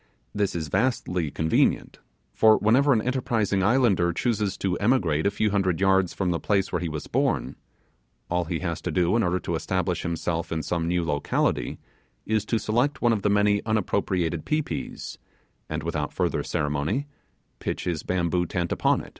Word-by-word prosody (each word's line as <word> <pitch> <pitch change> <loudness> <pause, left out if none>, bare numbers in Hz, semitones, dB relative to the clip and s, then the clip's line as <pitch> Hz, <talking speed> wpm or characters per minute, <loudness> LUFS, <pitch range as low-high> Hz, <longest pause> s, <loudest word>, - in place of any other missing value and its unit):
This 100 -3 0
is 80 -2 -2
vastly 90 - 0
convenient, 80 +3 +1 0.3
for 110 -1 +5
whenever 130 +7 +3
an 110 -4 +3
enterprising 115 -6 0
islander 100 -5 +3
chooses 105 -2 -1
to 95 -2 -1
emigrate 100 - +2
a - - +4
few 105 +1 0
hundred 95 -4 +1
yards 95 -2 +3
from 95 -2 -1
the 85 - -1
place 100 -2 0
where - - -1
he 85 - -2
was 75 -1 -5
born, - - 0 0.7
all 90 0 0
he 85 +1 -2
has 85 -3 -3
to - - -3
do 90 +3 +2
in 115 - +3
order 90 -2 +1
to 85 - -3
establish 90 +2 -1
himself 85 0 -2
in 80 -1 -2
some 85 -1 -1
new 85 0 0
locality, 75 -2 0 0.5
is 110 -1 0
to 115 - 0
select 120 +8 0
one 120 -1 +4
of 105 - -1
the 105 - +1
many 105 0 +3
unappropriated 95 -6 0
pi 155 +1 +1
pis, - - -6 0.5
and 80 -1 -3
without 80 -3 -2
further - - 0
ceremony 75 - -1 0.5
pitch - - -3
his 85 -4 -2
bamboo 90 -1 0
tent 85 -1 -2
upon - - +2
it. - - -11
95 Hz, 180 wpm, -25 LUFS, 85-110 Hz, 0.7 s, for